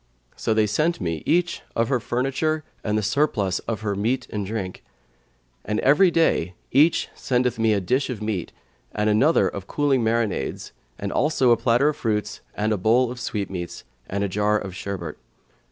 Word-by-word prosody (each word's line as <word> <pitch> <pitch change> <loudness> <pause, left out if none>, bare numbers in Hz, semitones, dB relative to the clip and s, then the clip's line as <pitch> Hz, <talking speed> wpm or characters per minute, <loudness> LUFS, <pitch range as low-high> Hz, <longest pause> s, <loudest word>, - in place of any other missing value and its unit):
So 110 - 0
they 110 -1 +4
sent 155 +12 0
me 85 -4 -2
each 175 +2 +1
of 115 +1 +1
her 130 -3 +2
furniture 135 +7 -1 0.2
and 105 -1 0
the 105 - 0
surplus 105 -5 +1
of 115 -1 -2
her 105 -2 -1
meat 120 +6 -1
and 105 -1 -2
drink: 95 -2 -5 0.8
and 105 - -1
every 150 +8 +5
day 125 - +1 0.2
each 150 +5 +4
sendeth 125 -2 0
me 110 -1 +3
a 100 - +2
dish 130 +10 0
of 125 -5 -4
meat 105 -5 -3 0.4
and 105 0 +1
another 135 +10 +4
of 100 -1 -6
cooling 140 -4 +1
marinades, 115 -2 -1 0.4
also 140 -5 +3
a - - +7
platter 120 +5 +3
of 150 - -3
fruits 105 -2 -2
and 110 +1 0
a - - 0
bowl 115 +6 +3
of 125 - -7
sweetmeats 95 -7 -4 0.3
and 100 +1 -1
a - - +1
jar 105 +2 +1
of 95 -3 -6
sherbet. 90 -6 -5
110 Hz, 175 wpm, -24 LUFS, 100-130 Hz, 0.8 s, a